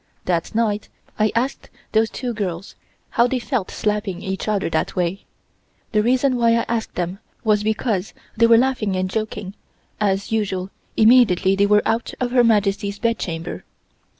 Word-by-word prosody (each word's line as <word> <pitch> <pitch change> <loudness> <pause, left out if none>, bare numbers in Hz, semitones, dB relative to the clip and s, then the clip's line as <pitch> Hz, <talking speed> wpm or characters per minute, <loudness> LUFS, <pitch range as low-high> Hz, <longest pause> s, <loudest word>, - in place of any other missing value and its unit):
That 175 +2 -1
night 215 -2 0 0.3
I 215 0 +3
asked 250 +4 -1 0.2
those 220 0 +3
two 245 +1 -4
girls 195 -4 -4 0.4
how 235 +1 +3
they 260 - -1
felt 245 -5 -2
slapping 210 -4 -2
each 190 +1 -4
other 210 -2 0
that 160 - -1
way. 180 +2 -1 0.7
The 215 - +3
reason 255 +3 +2
why 230 -1 +4
I 230 - +1
asked 230 -1 -2
them 180 +2 -3 0.2
was 210 -2 +3
because 215 -2 -1 0.2
they 230 +1 +5
were 230 0 +7
laughing 235 -6 +1
and 185 0 0
joking 215 -3 -4 0.5
as 200 -1 0
usual 195 -4 -1 0.3
immediately 215 -5 +5
they 200 +1 +3
were 210 0 +4
out 225 +1 -1
of 245 -1 -1
Her 245 -1 +5
Majesty's 205 -2 +1
bedchamber. 175 -8 -3
215 Hz, 160 wpm, -21 LUFS, 195-230 Hz, 0.7 s, were